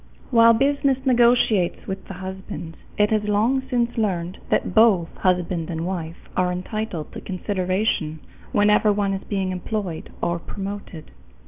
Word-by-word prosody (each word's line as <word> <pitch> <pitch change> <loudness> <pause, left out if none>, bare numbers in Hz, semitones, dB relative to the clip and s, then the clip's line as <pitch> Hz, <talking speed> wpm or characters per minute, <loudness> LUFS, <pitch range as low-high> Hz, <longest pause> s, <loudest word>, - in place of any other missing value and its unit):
While 230 -1 +7
business 275 +2 +2
negotiates 235 -7 +3
with 190 0 -6
the 195 - -7
husband, 185 -3 -7 0.2
it 210 +1 +3
has 215 -1 +1
long 220 +6 +2
since 240 -2 0
learned 185 -3 -1
that - - +1
both 205 -6 +4
husband 180 -2 0
and 165 -1 -3
wife 170 -3 -5
are 180 -1 +2
entitled 180 -2 -4
to - - -7
consideration 185 -4 -1 0.3
whenever 210 +1 +4
one 200 -1 0
is 195 - -4
being 195 -2 -1
employed 185 -2 -4
or 170 0 -1
promoted. 195 -4 -7
195 Hz, 140 wpm, -23 LUFS, 180-220 Hz, 0.3 s, While